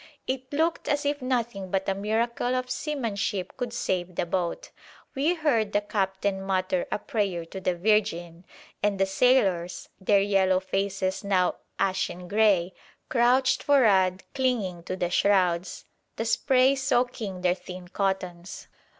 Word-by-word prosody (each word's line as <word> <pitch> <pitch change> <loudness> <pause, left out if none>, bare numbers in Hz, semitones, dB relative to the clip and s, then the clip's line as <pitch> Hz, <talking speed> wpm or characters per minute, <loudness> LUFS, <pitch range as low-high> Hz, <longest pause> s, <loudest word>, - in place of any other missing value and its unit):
It 260 0 -4
looked 320 +3 0
as 290 0 0
if 285 0 0
nothing 235 -7 -2
but 190 +1 -1
a 195 - +2
miracle 230 +5 -1
of 255 0 -2
seamanship 210 - -2
could 245 -2 -4
save 185 -6 -2
the - - 0
boat. 175 0 -3 0.4
We 300 +6 +1
heard 235 -10 +1
the 205 - +3
captain 195 -1 -1
mutter 185 -1 -1
a - - +1
prayer 195 -6 -2
to 190 +4 -8
the 185 -1 0
Virgin, 175 -3 0 0.4
and 205 -2 0
the 195 - +4
sailors, 190 -5 +1
their 200 +1 +3
yellow 195 -2 +3
faces 190 0 -2
now 190 -3 +1 0.2
ashen 185 -2 -1
grey, 200 -3 +3 0.4
crouched 255 +2 +3
for'ad 195 -9 +3
clinging 230 -10 -1
to 185 - -3
the 175 -2 -2
shrouds, 180 -2 +1 0.3
the 225 - -3
spray 255 +3 +3
soaking 245 -8 -1
their 180 -1 +3
thin 180 -1 -10
cottons. 185 -2 -3
195 Hz, 140 wpm, -26 LUFS, 185-240 Hz, 0.4 s, the